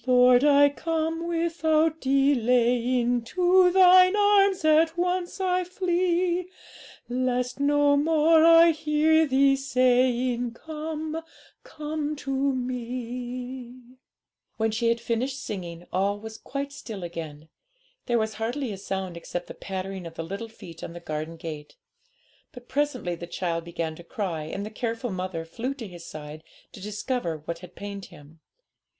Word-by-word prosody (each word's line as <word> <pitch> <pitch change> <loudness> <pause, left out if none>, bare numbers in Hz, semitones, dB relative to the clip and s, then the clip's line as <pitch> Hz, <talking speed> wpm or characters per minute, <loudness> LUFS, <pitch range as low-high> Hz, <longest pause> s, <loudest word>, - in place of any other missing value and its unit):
'Lord, 250 0 +6
I 285 -1 +6
come 325 +2 -2
without 325 -2 +1
delaying, 245 -2 +2
To 360 +8 +4
Thine 370 +1 +7
arms 400 -3 +4
at 320 +2 +4
once 360 +1 -1
I 365 -1 +1
flee, 360 -1 0 0.6
Lest 250 +1 -1
no 290 0 +3
more 315 +2 +4
I 330 0 +8
hear 315 0 +2
Thee 275 0 +4
saying, 250 -2 +1
"Come, 315 +3 -5 0.4
come 300 0 -4
to 280 -2 -6
Me."' 250 -1 -3 0.8
When 220 0 +1
she 230 +2 0
had 235 0 +1
finished 240 +4 -2
singing, 175 -7 -6
all 200 +2 0
was 220 +1 -9
quite 280 0 -5
still 220 -9 -8
again; 160 -3 -7 0.6
there 240 -2 +2
was 220 -1 -1
hardly 230 +2 -3
a - - -7
sound 190 -2 -4
except 175 +1 -5
the - - -9
pattering 190 -2 -6
of 165 - -11
the 165 - -4
little 200 +7 -6
feet 170 -7 -12
on - - -6
the 175 - -8
garden 155 0 -5
path. 160 -3 -8 0.8
But 245 -1 -13
presently 260 -10 -1
the 175 0 -7
child 170 -2 -3
began 165 -2 -4
to 170 - -11
cry, 170 -7 -4
and 195 +6 -5
the 215 - -7
careful 230 +1 -3
mother 185 -3 -4
flew 240 +11 -4
to 235 -6 -7
his 175 -2 -11
side 155 0 -9 0.3
to 200 - -12
discover 210 - -3
what 170 0 -4
had 180 0 -13
pained 200 -1 -7
him. 150 +2 -16
250 Hz, 145 wpm, -26 LUFS, 195-310 Hz, 0.8 s, I